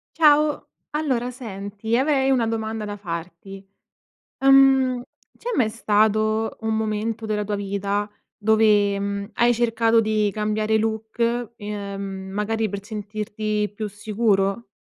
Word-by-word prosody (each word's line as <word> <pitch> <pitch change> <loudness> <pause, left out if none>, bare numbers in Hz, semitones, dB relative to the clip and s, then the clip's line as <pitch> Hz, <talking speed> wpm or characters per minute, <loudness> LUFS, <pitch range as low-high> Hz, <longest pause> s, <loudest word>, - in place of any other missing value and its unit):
Ciao. 300 -1 +4 0.2
Allora 270 -6 -1
senti, 215 -2 -4
avrei 270 0 +2
una 245 -4 +2
domanda 220 -1 -3
da 205 0 -5
farti, 180 +1 -7 0.8
uhm, 270 -2 +5 0.3
c'è 480 - -6
mai 225 -4 +3
stato 215 0 +1
un 220 0 -1
momento 220 +1 -2
della 210 -1 -1
tua 205 0 -2
vita 200 +1 -2 0.3
dove, 210 -2 +3
mhmm, 200 0 -3
hai 240 0 +3
cercato 230 -1 +2
di 215 -2 +1
cambiare 215 +1 0
look, 225 +2 -1
ehm, 205 -2 -5 0.3
magari 215 +2 -1
per 200 0 -5
sentirti 210 0 -3
più 215 0 -3
sicuro? 210 0 0
215 Hz, 120 wpm, -23 LUFS, 205-230 Hz, 0.8 s, uhm